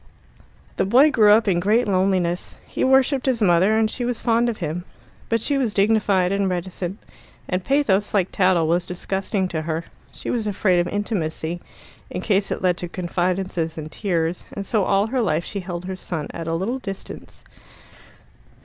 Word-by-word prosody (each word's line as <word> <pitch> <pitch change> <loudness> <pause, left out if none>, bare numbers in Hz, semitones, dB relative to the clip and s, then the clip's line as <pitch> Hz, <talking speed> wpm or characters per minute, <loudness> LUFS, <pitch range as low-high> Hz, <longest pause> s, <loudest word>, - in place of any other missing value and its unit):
The - - +2
boy 265 +8 +6
grew 215 -7 +5
up 220 +1 +5
in 180 -3 +3
great 215 +6 +2
loneliness. 185 -2 0
He - - -3
worshipped 265 +1 +3
his 255 -3 +2
mother, 190 +4 +4
and 220 0 +3
she 245 +3 -4
was 240 -1 -1
fond 235 +1 +2
of 225 - -3
him. 170 0 -3 0.5
But 230 -1 +1
she 285 -2 +1
was 235 -6 -1
dignified 200 -3 +3
and 200 -1 +1
reticent, 180 +1 -4 0.5
and 185 0 -1
pathos, 210 -7 +2
like 195 -3 +1
tattle, 185 -4 +3
was 175 +2 +1
disgusting 190 +2 -2
to 160 -3 -2
her. 160 +1 -3 0.3
She - - -5
was 225 -3 -1
afraid 190 -3 +2
of 175 - +1
intimacy, 175 -5 -3 0.5
in - - -4
case 200 -1 +1
it - - -3
led 180 -1 +2
to 175 - -4
confidences 175 -2 -2
and 155 0 -6
tears, 170 -4 -1
and 200 - -5
so 210 -3 +1
all 195 +1 +2
her 250 +3 -1
life 165 -6 0
she 200 - -4
held 180 -1 -6
her 190 0 -4
son 165 -4 -5
at 165 -1 -6
a 165 - 0
little 220 +10 -2
distance. 195 -5 -8
190 Hz, 185 wpm, -22 LUFS, 175-220 Hz, 0.5 s, boy